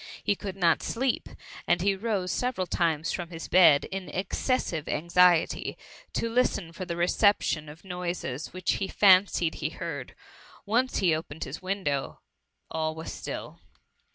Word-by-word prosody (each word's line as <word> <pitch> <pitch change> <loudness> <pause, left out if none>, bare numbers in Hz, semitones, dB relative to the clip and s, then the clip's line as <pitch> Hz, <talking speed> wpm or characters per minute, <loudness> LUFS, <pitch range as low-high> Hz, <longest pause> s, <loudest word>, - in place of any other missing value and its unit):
He - - +2
could 195 -1 -6
not 170 -4 +3
sleep; 255 +2 -1 0.4
and 175 - +3
he 195 +2 +2
rose 195 -3 -1
several 245 -7 -1
times 165 -2 0
from 175 -2 -4
his 165 -2 -7
bed, 165 -6 +6
in 190 -1 -5
excessive 185 - -1
anxiety, 170 +1 +3 0.4
to - - -1
listen 225 -7 0
for 185 +2 -6
the 170 -1 -4
repetition 175 -3 +2
of 160 +5 -13
noises 175 -6 -4
which 185 0 -1
he 195 - 0
fan 190 -1 +6
cied 165 -3 -1
he 150 - -3
heard: 160 -6 -6 0.5
once 245 +5 +1
he 180 -5 +3
opened 155 -1 -4
his 135 +3 -7
window 185 -8 -2 0.5
all 155 0 -1
was 160 0 -6
still. - - -7
180 Hz, 155 wpm, -28 LUFS, 160-195 Hz, 0.5 s, bed